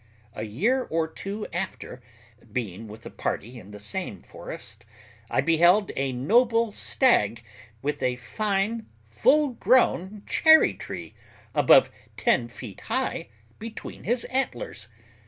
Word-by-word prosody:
A 105 - -6
year 215 - +1
or 160 0 -1
two 200 +6 -6
after, 175 -8 -5 0.5
being 110 -2 -4
with 110 +2 -12
a - - -8
party 120 +4 -4
in 100 - -14
the 105 - -9
same 105 - -4
forest, - - -9 0.5
I - - +2
beheld 175 +7 +4
a 135 -1 -1
noble 230 - +3
stag 120 - +2 0.4
with 150 +1 -2
a 125 -1 +1
fine 200 - -2 0.2
full 290 - +4
grown 215 -5 +2
cherry 315 0 +6
tree - - -7 0.4
above - - +6 0.3
ten 175 - +2
feet 120 -4 -10
high - - -1 0.3
between 225 0 -8
his 240 +2 0
antlers. 120 - -3
170 Hz, 125 wpm, -26 LUFS, -, 0.5 s, cherry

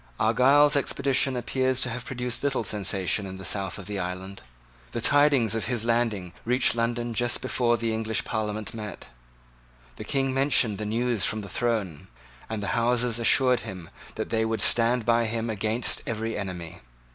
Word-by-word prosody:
Argyle's 135 +7 +4
expedition 135 -1 +1
appears 130 +1 0
to - - +1
have 125 +2 -6
produced 125 -1 -3
little 135 -4 0
sensation 100 -1 0
in 95 0 -8
the 95 - -8
south 95 -2 0
of 95 - -9
the 105 -1 -4
island. 95 +2 -6 0.5
The - - -2
tidings 140 -4 +4
of 115 - -2
his 120 -2 -1
landing 115 -7 -1
reached 125 +2 +2
London 120 0 -1
just 120 +2 0
before 120 -2 +1
the 115 0 -2
English 110 0 -1
Parliament 105 -1 -3
met. 105 - -8 0.9
The - - -6
King 135 -2 -1
mentioned 130 -6 +2
the 105 - -4
news 115 -2 -1
from 110 0 -1
the 100 - -9
throne; 105 -9 -2 0.4
and 110 -2 -4
the 100 - -3
Houses 120 0 +1
assured 125 +2 +4
him 90 -4 -9 0.2
that - - -4
they 110 -1 +1
would 110 0 -1
stand 120 0 +3
by 115 0 +3
him 115 +1 -2
against 110 +3 +1
every 115 0 -3
enemy. 90 -5 -6
115 Hz, 170 wpm, -26 LUFS, 105-125 Hz, 0.9 s, Argyle's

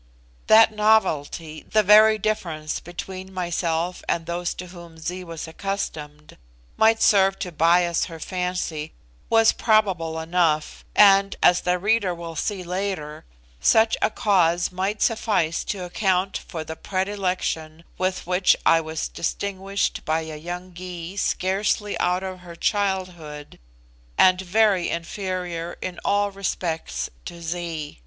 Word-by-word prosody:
That 220 0 +7
novelty, 165 -7 +1
the 215 0 +5
very 215 +2 +7
difference 165 -8 -2
between 185 +2 -8
myself 175 -1 -2
and 165 - 0
those 175 +1 -3
to 180 - -7
whom 170 -2 -12
Zee 180 +3 -5
was 165 -1 -7
accustomed, 155 -5 -5 0.4
might 225 0 +4
serve 195 -1 +4
to 180 - -5
bias 170 +2 +3
her 165 -2 -9
fancy 180 -3 -3 0.4
was 225 -1 +5
probable 185 -8 +1
enough, 160 -2 0
and 195 -1 +6
as 175 - +5
the 180 0 +1
reader 200 -1 +1
will 170 -1 -8
see 190 +3 -2
later, 180 -4 -4 0.3
such 220 - +4
a - - +3
cause 180 -6 +2
might 190 +3 -1
suffice 205 -8 +1
to 190 -3 -4
account 190 +1 0
for 160 -3 -5
the 160 +1 -7
predilection 185 -5 -2 0.2
with 185 0 -1
which 180 +1 +3
I 165 - +5
was 160 0 -4
distinguished 195 +2 -2
by 160 0 0
a 160 -1 -7
young 175 +3 -7
Gy 180 0 -7
scarcely 200 +2 0
out 180 +1 +1
of 185 -1 -5
her 175 -1 -11
childhood, 180 -7 -2 0.6
and 185 0 +5
very 195 -1 +2
inferior 175 -1 -4
in 185 -1 -5
all 205 0 +1
respects 180 -4 -3 0.2
to 170 - -8
Zee. 165 - -5
180 Hz, 135 wpm, -23 LUFS, 165-195 Hz, 0.6 s, That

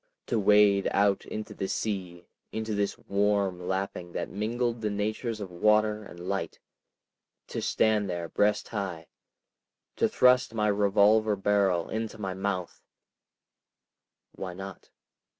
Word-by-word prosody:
To 115 - 0
wade 105 -1 +5
out 100 0 +2
into 110 0 -6
the 95 - -3
sea, 95 -6 -3 0.3
into 110 0 -3
this 100 -1 -1
warm 100 -2 0
lapping 95 -2 -3
that - - -4
mingled 115 +3 -1
the 105 - 0
natures 110 +2 -2
of 100 -3 -6
water 105 +3 +2
and 90 -3 -12
light, 95 -5 -2 0.9
to - - -3
stand 105 -2 +2
there 85 -1 -3
breast 105 +4 +1
high, 95 -7 -4 0.9
to - - +2
thrust 125 -2 +4
my 105 -1 +2
revolver 105 +1 +4
barrel 95 -3 +1
into 110 0 -4
my 95 -3 -3
mouth———? 95 -2 -3 1.5
Why 90 -2 -7
not? 95 0 -9
100 Hz, 130 wpm, -28 LUFS, 95-110 Hz, 1.5 s, wade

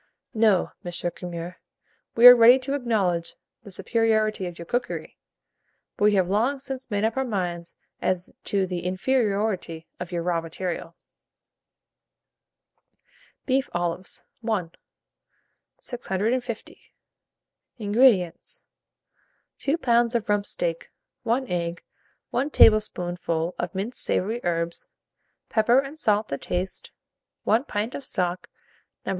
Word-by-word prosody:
'" - - -56
No, 195 -4 +2
M. 175 - -5 0.2
Curmer, 175 0 -7 0.6
we 235 - +5
are 245 0 +13
ready 240 +2 +8
to 265 +1 -3
acknowledge 205 -11 0 0.3
the 210 - -12
superiority 215 -1 0
of 175 -1 -8
your 170 - -8
cookery, 245 +8 -3 0.8
but 205 - +1
we 210 -1 +5
have 185 -2 +3
long 230 +9 +1
since 265 -1 -6
made 205 -1 -1
up 225 +3 0
our 265 - +2
minds 180 -7 -3 0.3
as 185 -1 -1
to 195 -2 +1
the 180 -1 -3
inferiority 195 -3 -1
of 180 0 -6
your 170 -1 -2
raw 170 -1 0
material. 165 0 -5 2.5
BEEF 270 +1 +1
OLIVES. 175 +1 -2 0.3
I. 185 -7 0 1.1
650. 235 0 -3 1.0
INGREDIENTS. 220 - +2 1.0
2 285 +4 0
lbs. 240 -4 +2
of 230 -3 0
rump 205 -1 +1
steak, 165 -1 -3 0.3
1 245 +3 0
egg, 170 -2 -3 0.5
1 265 +5 0
tablespoonful 175 - +3
of 175 +1 -3
minced 205 +6 -2
savoury 225 +6 0
herbs, 170 -1 -2 0.6
pepper 235 +3 +3
and 275 +3 -1
salt 210 -4 +1
to 140 - -3
taste, 180 +1 -4 0.5
1 230 +5 +2
pint 215 +1 -3
of 280 - -6
stock, 180 -6 -2 0.6
No. - - -3
205 Hz, 120 wpm, -25 LUFS, 175-240 Hz, 2.5 s, are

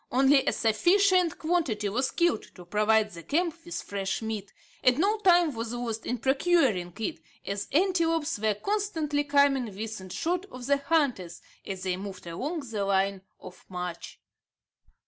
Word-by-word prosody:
Only 270 +2 +5
a - - +4
sufficient 360 - +3
quantity 310 -11 0
was 255 +6 0
killed 340 -10 +1
to 180 - -12
provide 215 +3 +2
the 170 -2 -9
camp 335 - 0
with 345 - -5
fresh 195 -1 -3
meat, 215 -3 -4 0.3
and 250 0 +4
no 410 +6 +2
time 350 -6 +4
was 230 0 -4
lost 235 -2 -4
in 245 - -1
procuring 265 - +2
it, 220 -2 -3 0.3
as 200 0 -3
antelopes 330 - +1
were 215 -1 +1
constantly 320 - -1
coming 280 -2 +3
within 210 -2 -6
shot 350 - -2
of 255 -5 -9
the 280 +2 +3
hunters, 275 - 0 0.2
as 190 -2 -5
they 185 -1 -1
moved 195 -1 -8
along 285 - -4
the 225 -7 -3
line 195 0 +1 0.2
of 185 - -12
march. 180 -2 -6
245 Hz, 155 wpm, -28 LUFS, 200-325 Hz, 0.3 s, Only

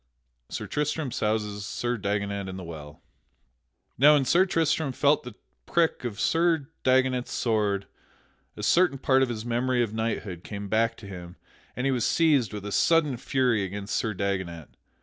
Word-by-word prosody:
[Sidenote: - - -6
Sir - - -4
Tristram 150 -2 -1
souses 105 -2 -1
Sir 120 +3 -2
Dagonet 100 -2 -2
in 95 - -6
the 95 - -7
well] 75 -3 -10 1.0
Now 150 +3 +7
when 140 -2 +2
Sir 180 +8 +4
Tristram 160 -4 +1
felt 145 +3 +3
the 125 -4 -10 0.3
prick 165 -5 +1
of 110 -4 -4
Sir 165 -3 +1
Dagonet's 130 -1 +2
sword, 105 -4 0 0.7
a - - -6
certain 175 -5 +3
part 130 0 +3
of 130 - +2
his 115 -1 -4
memory 120 +1 +1
of 110 -2 -4
knighthood 110 -6 -3
came 100 -1 -6
back 115 +2 +1
to 105 - -12
him 90 -2 -9 0.4
and 125 - -2
he 135 - +2
was 125 -3 0
seized 145 - +3
with 105 -1 -7
a 105 - -4
sudden 155 +2 +3
fury 125 -4 +1
against 100 +2 -4
Sir 110 -2 -1
Dagonet. 95 -5 -3
115 Hz, 170 wpm, -26 LUFS, 100-135 Hz, 1.0 s, Now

